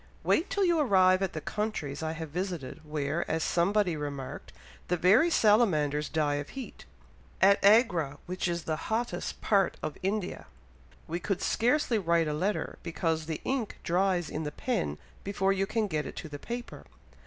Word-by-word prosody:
"Wait 340 Hz, +6 st, +2 dB
till 400 Hz, -1 st, +1 dB
you 340 Hz, -2 st, +3 dB
arrive 190 Hz, -8 st, +4 dB
at 195 Hz, -, -1 dB
the 155 Hz, -, -3 dB
countries 160 Hz, -8 st, -3 dB
I 160 Hz, 0 st, -2 dB
have 160 Hz, -2 st, -6 dB
visited, 175 Hz, -4 st, -4 dB
where, 150 Hz, +1 st, -2 dB
as 160 Hz, 0 st, 0 dB
somebody 180 Hz, 0 st, +2 dB
remarked, 145 Hz, -3 st, -6 dB, 0.4 s
the 180 Hz, -, +1 dB
very 215 Hz, -, +5 dB
salamanders 165 Hz, -, +3 dB
die 150 Hz, -2 st, +1 dB
of 145 Hz, 0 st, -5 dB
heat. 260 Hz, -5 st, -8 dB, 0.5 s
At 200 Hz, +2 st, +5 dB
Agra, 190 Hz, -, +4 dB
which 185 Hz, +1 st, -2 dB
is 170 Hz, -1 st, -2 dB
the 160 Hz, -, -1 dB
hottest 235 Hz, +2 st, -2 dB
part 195 Hz, -3 st, +2 dB
of 155 Hz, -1 st, -4 dB
India, 195 Hz, 0 st, -2 dB, 0.6 s
we 170 Hz, +2 st, -3 dB
could 195 Hz, +1 st, -2 dB
scarcely 245 Hz, -1 st, +2 dB
write 170 Hz, -3 st, +2 dB
a 150 Hz, -, -1 dB
letter, 190 Hz, +8 st, -2 dB
because 165 Hz, -2 st, -2 dB
the 160 Hz, -2 st, -4 dB
ink 255 Hz, -5 st, -2 dB
dries 180 Hz, -1 st, +1 dB
in 155 Hz, -, -4 dB
the 150 Hz, -, -3 dB
pen 180 Hz, -, -2 dB, 0.3 s
before 195 Hz, -1 st, +1 dB
you 195 Hz, 0 st, 0 dB
can 220 Hz, +1 st, 0 dB
get 155 Hz, -7 st, -2 dB
it -, -, -8 dB
to 160 Hz, -, -6 dB
the 145 Hz, -1 st, -8 dB
paper. 240 Hz, +6 st, -7 dB
180 Hz, 175 wpm, -29 LUFS, 155-210 Hz, 0.6 s, very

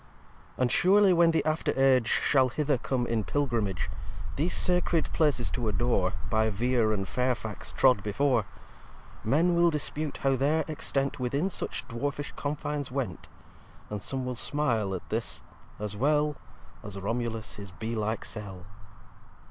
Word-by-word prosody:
v -, -, -4 dB
And 120 Hz, -, +2 dB
surely 195 Hz, +3 st, +5 dB
when 170 Hz, -1 st, +5 dB
the 160 Hz, -3 st, +1 dB
after 155 Hz, -3 st, 0 dB
Age 130 Hz, -3 st, +4 dB
Shall 130 Hz, 0 st, +3 dB
hither 145 Hz, 0 st, 0 dB
come 125 Hz, -1 st, -1 dB
in 115 Hz, -2 st, 0 dB
Pilgrimage, 115 Hz, -9 st, -1 dB, 0.5 s
These 160 Hz, +6 st, 0 dB
sacred 180 Hz, -3 st, +1 dB
Places 145 Hz, -7 st, +2 dB
to 120 Hz, -3 st, -2 dB
adore, 100 Hz, -3 st, +1 dB
By 110 Hz, 0 st, +2 dB
Vere 115 Hz, +1 st, +1 dB
and 95 Hz, -2 st, -1 dB
Fairfax 125 Hz, -2 st, -2 dB
trod 125 Hz, -6 st, +4 dB
before, 115 Hz, +2 st, +1 dB, 0.8 s
Men 160 Hz, +10 st, +3 dB
will 170 Hz, 0 st, +5 dB
dispute 150 Hz, -1 st, -2 dB
how 135 Hz, -1 st, +3 dB
their 150 Hz, +4 st, +1 dB
Extent 140 Hz, -3 st, -2 dB
Within 140 Hz, +9 st, 0 dB
such 125 Hz, -, -3 dB
dwarfish 140 Hz, +4 st, -3 dB
Confines 145 Hz, -1 st, -3 dB
went: 125 Hz, -, -4 dB, 0.6 s
And 105 Hz, -1 st, -3 dB
some 130 Hz, +5 st, -2 dB
will 125 Hz, -, -2 dB
smile 115 Hz, -7 st, 0 dB
at 90 Hz, -, -8 dB
this, -, -, -3 dB, 0.3 s
as 105 Hz, -1 st, -4 dB
well 150 Hz, +5 st, +2 dB, 0.5 s
As 100 Hz, -1 st, -8 dB
Romulus 115 Hz, +2 st, -3 dB
his 100 Hz, -1 st, -8 dB
Bee 110 Hz, +6 st, -5 dB
like 110 Hz, 0 st, -2 dB
Cell. 95 Hz, -4 st, -4 dB
125 Hz, 150 wpm, -28 LUFS, 110-150 Hz, 0.8 s, surely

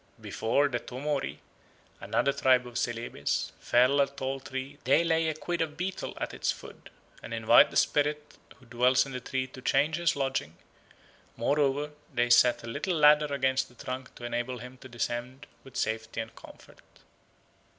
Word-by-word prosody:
Before 140 Hz, +6 st, +1 dB
the 125 Hz, -4 st, -2 dB
Tomori, 135 Hz, +3 st, -3 dB, 0.6 s
another 140 Hz, -, 0 dB
tribe 130 Hz, -2 st, +3 dB
of 120 Hz, -1 st, -4 dB
Celebes, 120 Hz, -1 st, -2 dB
fell 130 Hz, +4 st, +4 dB
a 140 Hz, -, +3 dB
tall 135 Hz, -1 st, -4 dB
tree 135 Hz, +2 st, -6 dB
they 135 Hz, +6 st, +4 dB
lay 165 Hz, -1 st, +2 dB
a 155 Hz, -, -3 dB
quid 170 Hz, +2 st, -3 dB
of 155 Hz, -1 st, -2 dB
betel 185 Hz, +2 st, -4 dB
at -, -, -4 dB
its -, -, 0 dB
foot, -, -, -11 dB, 0.3 s
and 115 Hz, -, -6 dB
invite 110 Hz, -1 st, +6 dB
the -, -, -3 dB
spirit 150 Hz, 0 st, +1 dB, 0.2 s
who 125 Hz, -, -21 dB
dwells 125 Hz, +2 st, +3 dB
in 135 Hz, -, -8 dB
the 125 Hz, -, -4 dB
tree 130 Hz, +1 st, -2 dB
to 130 Hz, 0 st, -12 dB
change 145 Hz, +5 st, +2 dB
his 170 Hz, -1 st, +1 dB
lodging; 135 Hz, -, -2 dB, 0.8 s
moreover, 145 Hz, +4 st, +1 dB, 0.2 s
they 120 Hz, 0 st, +1 dB
set 120 Hz, 0 st, +5 dB
a -, -, -8 dB
little 155 Hz, +10 st, -2 dB
ladder 150 Hz, -1 st, +5 dB
against 130 Hz, -1 st, +1 dB
the 125 Hz, -, -20 dB
trunk 130 Hz, +1 st, -7 dB
to -, -, -12 dB
enable 120 Hz, +1 st, -3 dB
him 125 Hz, +2 st, -10 dB
to 130 Hz, -, -12 dB
descend 120 Hz, +2 st, -4 dB, 0.2 s
with 135 Hz, -, -10 dB
safety 110 Hz, 0 st, -2 dB
and 110 Hz, 0 st, -6 dB
comfort. -, -, -15 dB
130 Hz, 170 wpm, -29 LUFS, 120-145 Hz, 0.8 s, invite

